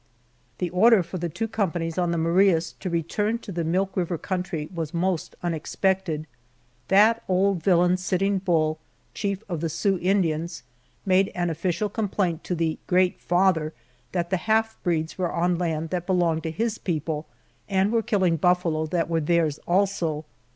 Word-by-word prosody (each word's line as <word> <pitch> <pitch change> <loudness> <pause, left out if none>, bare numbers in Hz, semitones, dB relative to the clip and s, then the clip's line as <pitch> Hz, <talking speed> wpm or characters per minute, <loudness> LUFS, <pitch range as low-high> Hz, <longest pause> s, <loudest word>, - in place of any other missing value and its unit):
The 180 -2 -2
order 210 +2 +5
for 175 +2 -6
the 170 0 -2
two 225 +8 -3
companies 175 -6 -2
on 175 -1 +1
the 170 - 0
Marias 170 0 +3
to 185 - -4
return 190 +7 0
to 230 - -9
the 170 -2 -2
Milk 185 +4 0
River 175 -2 -1
country 180 -3 -3
was 165 -1 -4
most 180 -1 -1
unexpected. 170 0 -1 0.6
That 215 +4 +5
old 190 -1 +2
villain 180 +1 +3
Sitting 190 +2 0
Bull, 160 -4 +1 0.3
chief 200 0 -3
of 170 -5 -3
the 165 - -1
Sioux 190 +4 0
Indians, 170 -3 0 0.4
made 190 0 +3
an 175 -1 0
official 175 +5 -1
complaint 195 -6 -1
to 180 - -1
the 165 -1 -1
"Great 180 0 +2
Father" 175 -3 +2 0.4
that 175 -1 -2
the 190 - +2
half 220 +3 +1
breeds 165 0 -1
were 180 -2 0
on 175 0 +1
land 160 -2 -2
that 175 -1 -2
belonged 175 -4 +2
to 160 - -3
his 225 +5 -2
people, 155 -2 -3 0.4
and 195 +1 +2
were 230 -1 +2
killing 190 -7 +1
buffalo 165 -2 +1
that 165 +1 0
were 165 -1 0
theirs 160 -2 +1
also. 175 -5 +1
180 Hz, 165 wpm, -25 LUFS, 165-195 Hz, 0.6 s, order